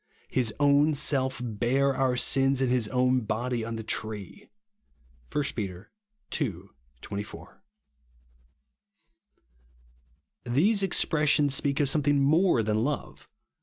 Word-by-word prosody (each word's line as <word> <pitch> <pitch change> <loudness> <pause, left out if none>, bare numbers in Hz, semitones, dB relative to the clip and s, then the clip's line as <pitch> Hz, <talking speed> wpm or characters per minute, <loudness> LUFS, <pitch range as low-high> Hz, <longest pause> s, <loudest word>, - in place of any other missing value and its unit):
His 125 -4 0
own 145 +1 +4
self 135 -2 +1
bare 125 +5 0
our 130 -1 +1
sins 135 +1 +2
in 130 -2 +1
his 125 -3 +1
own 130 +1 +2
body 115 +2 -2
on 115 0 -4
the 110 - -5
tree" 110 - -5 0.8
(1 145 - 0
Pet. 95 -3 -6 0.5
ii. 125 -9 0 0.5
24). 100 - -8 2.8
These 175 - +2
expressions 150 -6 +2
speak 140 0 -1
of 145 - +2
something 145 0 +2
more 155 -2 +3
than 110 +1 0
love. 145 +3 -4
130 Hz, 110 wpm, -27 LUFS, 115-145 Hz, 2.8 s, own